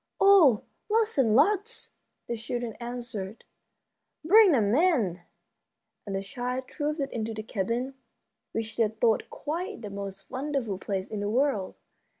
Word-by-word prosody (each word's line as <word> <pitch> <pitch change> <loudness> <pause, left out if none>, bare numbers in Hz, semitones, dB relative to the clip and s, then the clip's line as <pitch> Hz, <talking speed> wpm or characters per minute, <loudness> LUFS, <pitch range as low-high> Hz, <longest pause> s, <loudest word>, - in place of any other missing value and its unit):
"Oh, 360 - +6 0.3
lots 445 -5 +2
and 225 -5 +4
lots!" 420 - +2 0.3
the 235 - -3
children 235 +1 -4
answered. 235 -4 -6 0.8
"Bring 410 +3 +7
them 215 -7 +3
in." 250 - +2 0.9
And 195 - -3
the 195 - -2
children 250 +3 -3
trooped 300 +3 -3
into 225 -1 -3
the 215 - -5
cabin, 230 +6 -2 0.6
which 220 -1 -4
they 225 - +4
thought 220 +1 +1
quite 345 - -4
the 205 - -6
most 195 -1 -7
wonderful 260 -7 -2
place 195 -1 -3
in 215 - -5
the 205 0 -1
world. 235 -5 +1
235 Hz, 140 wpm, -28 LUFS, 210-290 Hz, 0.9 s, Bring